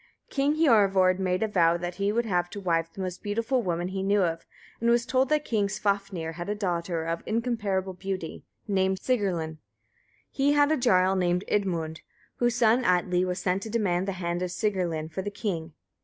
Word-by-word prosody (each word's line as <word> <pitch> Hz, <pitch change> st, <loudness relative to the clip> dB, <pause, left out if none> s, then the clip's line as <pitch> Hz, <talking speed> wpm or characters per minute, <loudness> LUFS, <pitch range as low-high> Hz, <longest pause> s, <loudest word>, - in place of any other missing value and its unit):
King 285 Hz, +2 st, +1 dB
Hiorvard 195 Hz, -, +4 dB
made 185 Hz, +2 st, 0 dB
a -, -, +1 dB
vow 170 Hz, -5 st, +3 dB
that 175 Hz, 0 st, -5 dB
he 200 Hz, +1 st, +2 dB
would 235 Hz, +2 st, 0 dB
have 180 Hz, -4 st, 0 dB
to 205 Hz, -, -7 dB
wife 165 Hz, -3 st, 0 dB
the 190 Hz, -, -8 dB
most 185 Hz, -1 st, -4 dB
beautiful 230 Hz, +5 st, 0 dB
woman 175 Hz, -2 st, -2 dB
he 190 Hz, 0 st, -3 dB
knew 200 Hz, +1 st, +2 dB
of, 165 Hz, -1 st, -2 dB, 0.3 s
and 235 Hz, -, +1 dB
was 235 Hz, 0 st, +3 dB
told 260 Hz, +1 st, +1 dB
that 300 Hz, -1 st, +1 dB
King 210 Hz, -3 st, +1 dB
Svafnir 200 Hz, -5 st, -2 dB
had 175 Hz, +3 st, -6 dB
a 210 Hz, -, 0 dB
daughter 170 Hz, -4 st, -2 dB
of 165 Hz, 0 st, -2 dB
incomparable 210 Hz, -5 st, -1 dB
beauty, 185 Hz, -2 st, -5 dB, 0.2 s
named 190 Hz, -2 st, +1 dB
Sigrlinn. 175 Hz, -10 st, -1 dB, 0.7 s
He 280 Hz, +1 st, +2 dB
had 290 Hz, 0 st, +4 dB
a -, -, +4 dB
jarl 190 Hz, -7 st, +3 dB
named 180 Hz, 0 st, +1 dB
Idmund, 165 Hz, -6 st, -1 dB, 0.4 s
whose 240 Hz, -1 st, +1 dB
son 240 Hz, +1 st, +3 dB
Atli 180 Hz, -2 st, +2 dB
was 180 Hz, -1 st, -2 dB
sent 185 Hz, +1 st, 0 dB
to 220 Hz, -, -6 dB
demand 195 Hz, -5 st, 0 dB
the 195 Hz, -, -1 dB
hand 175 Hz, -1 st, -3 dB
of 180 Hz, -, -1 dB
Sigrlinn 175 Hz, -6 st, -2 dB
for 175 Hz, -, -3 dB
the 205 Hz, -, -3 dB
king. 170 Hz, -6 st, -4 dB
190 Hz, 195 wpm, -27 LUFS, 175-220 Hz, 0.7 s, Hiorvard